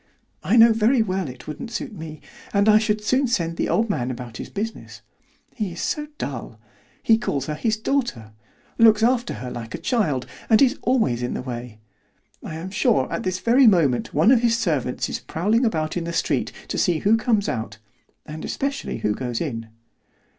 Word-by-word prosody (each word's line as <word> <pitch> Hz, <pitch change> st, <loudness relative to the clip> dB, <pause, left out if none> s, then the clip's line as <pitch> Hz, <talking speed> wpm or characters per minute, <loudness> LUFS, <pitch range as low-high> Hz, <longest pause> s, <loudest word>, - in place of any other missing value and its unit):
I 220 Hz, -, +2 dB
know 230 Hz, 0 st, +8 dB
very 225 Hz, +2 st, +3 dB
well 190 Hz, -4 st, -2 dB
it 125 Hz, 0 st, -11 dB
wouldn't 155 Hz, +10 st, -6 dB
suit 245 Hz, +1 st, -5 dB
me, 155 Hz, -4 st, -8 dB, 0.3 s
and 200 Hz, +1 st, +3 dB
I 215 Hz, 0 st, +7 dB
should 215 Hz, -1 st, -1 dB
soon 255 Hz, +5 st, +2 dB
send 170 Hz, -8 st, -1 dB
the -, -, -1 dB
old 225 Hz, +1 st, +2 dB
man 130 Hz, -, -1 dB
about 120 Hz, -3 st, -7 dB
his -, -, -7 dB
business. 220 Hz, +3 st, -6 dB, 0.5 s
He 205 Hz, -7 st, -3 dB
is 170 Hz, -, -9 dB
so 300 Hz, 0 st, -2 dB
dull; 120 Hz, -4 st, -6 dB, 0.4 s
he 225 Hz, -1 st, +4 dB
calls 140 Hz, -, -2 dB
her 150 Hz, -, -3 dB
his 215 Hz, +8 st, 0 dB
daughter; 220 Hz, -, -2 dB, 0.5 s
looks 220 Hz, -1 st, +6 dB
after 240 Hz, 0 st, +1 dB
her 125 Hz, -1 st, -6 dB
like 120 Hz, -1 st, -6 dB
a -, -, -4 dB
child; 165 Hz, -, 0 dB, 0.2 s
and 220 Hz, -2 st, +6 dB
is 270 Hz, 0 st, +3 dB
always 220 Hz, -, +1 dB
in 125 Hz, -, -2 dB
the -, -, -4 dB
way. 120 Hz, -3 st, -6 dB, 0.6 s
I 155 Hz, -, -7 dB
am 175 Hz, +4 st, -6 dB
sure 135 Hz, -9 st, +1 dB
at -, -, -2 dB
this 185 Hz, -1 st, -2 dB
very 240 Hz, +6 st, +4 dB
moment 160 Hz, -, +3 dB
one 160 Hz, -, +4 dB
of 250 Hz, -3 st, +5 dB
his 230 Hz, -1 st, +2 dB
servants 150 Hz, -, -1 dB
is -, -, -4 dB
prowling 215 Hz, +9 st, 0 dB
about 155 Hz, -8 st, -1 dB
in 175 Hz, -2 st, -2 dB
the 170 Hz, -, -4 dB
street -, -, 0 dB, 0.2 s
to -, -, -2 dB
see 175 Hz, -3 st, +2 dB
who 210 Hz, +3 st, +4 dB
comes 220 Hz, -2 st, +1 dB
out, 110 Hz, -2 st, -3 dB, 0.5 s
and 155 Hz, +1 st, -8 dB
especially 275 Hz, 0 st, -3 dB
who 105 Hz, -2 st, 0 dB
goes 120 Hz, 0 st, -3 dB
in." 115 Hz, -8 st, -4 dB
190 Hz, 195 wpm, -23 LUFS, -, 0.6 s, know